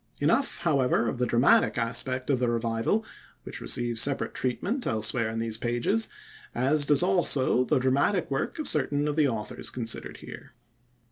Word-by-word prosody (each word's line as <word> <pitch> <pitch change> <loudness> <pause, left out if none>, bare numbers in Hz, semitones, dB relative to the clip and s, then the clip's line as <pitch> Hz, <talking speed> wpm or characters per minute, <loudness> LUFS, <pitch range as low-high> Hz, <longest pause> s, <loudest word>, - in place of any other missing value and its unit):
Enough, 230 - +1
however, 135 -7 +1
of 120 - -3
the 125 - +1
dramatic 120 +4 +3
aspect 130 +3 -1
of 130 - +1
the 125 -1 +1
Revival, 115 - -1 0.4
which - - -7
receives 120 - 0
separate 140 +1 0
treatment 200 - -2
elsewhere 110 0 0
in 110 - -5
these 115 -1 -2
pages, 120 - 0 0.5
as 145 +2 +2
does 145 +3 +4
also 170 -9 +2
the - - +1
dramatic 140 +7 +1
work 135 - -2
of 310 - -1
certain 145 +1 +1
of 150 - -1
the 155 -2 +3
authors 110 -5 -3
considered 115 -3 -4
here. - - -12
130 Hz, 160 wpm, -27 LUFS, 115-150 Hz, 0.5 s, does